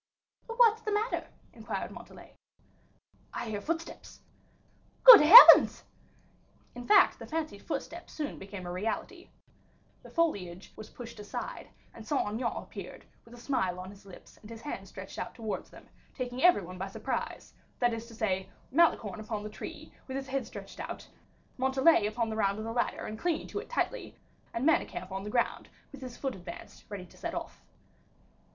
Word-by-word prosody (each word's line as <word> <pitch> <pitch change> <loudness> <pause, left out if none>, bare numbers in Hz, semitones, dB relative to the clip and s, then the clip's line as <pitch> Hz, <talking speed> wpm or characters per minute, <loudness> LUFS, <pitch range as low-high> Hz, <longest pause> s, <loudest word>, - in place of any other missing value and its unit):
"What's 460 -1 +4
the 430 - -3
matter?" 425 +3 -1 0.3
inquired - - -5
Montalais. - - -13 1.0
"I 235 - -4
hear 205 -1 -3
footsteps." 330 +4 -6 0.8
"Good - - +12
heavens!" 375 +12 +10 0.9
In 245 0 -9
fact 415 -2 +5
the - - -9
fancied 310 -10 -4
footsteps 340 +1 -6
soon 300 -2 -5
became 195 -1 -8
a 175 - -5
reality; 205 +5 -4 0.7
the - - -14
foliage 195 - -2
was 215 - -10
pushed 235 -2 -10
aside, 210 - -7 0.2
and 220 -1 -12
Saint 285 - 0
Aignan 230 +3 -2
appeared, - - -10 0.2
with 230 +1 -14
a - - -13
smile 190 -9 -1
on 185 +1 -8
his 200 0 -16
lips, 195 -2 -15
and 210 - -13
his 230 -1 -9
hand 195 -10 -6
stretched 190 +1 -9
out - - -6
towards 220 -3 -5
them, - - -16 0.3
taking 250 -1 -4
every 355 - +5
one 180 +1 -9
by 190 - -3
surprise; 195 - -5 0.2
that 240 -2 +1
is 230 0 -6
to 230 - -13
say, 190 -4 -2 0.2
Malicorne 250 - +2
upon 215 -1 -5
the 210 - -6
tree 310 +8 -9
with 265 0 -4
his 270 -1 -6
head 270 0 -2
stretched - - -10
out, - - -7 0.5
Montalais 265 -2 +4
upon 225 +1 -2
the - - -3
round 200 -2 +1
of 215 - -5
the 225 - -4
ladder 240 0 -1
and 215 0 -7
clinging 345 -3 -1
to - - -4
it 445 - -10
tightly, - - -3 0.3
and 230 +4 -3
Manicamp 200 - 0
on 190 +1 -4
the 210 - -6
ground 235 +2 -1 0.2
with 280 - -12
his 250 -2 -8
foot 270 -2 -3
advanced 175 -2 -11
ready 200 -3 -7
to - - -20
set - - -5
off. - - -7
235 Hz, 175 wpm, -30 LUFS, 200-305 Hz, 1.0 s, Good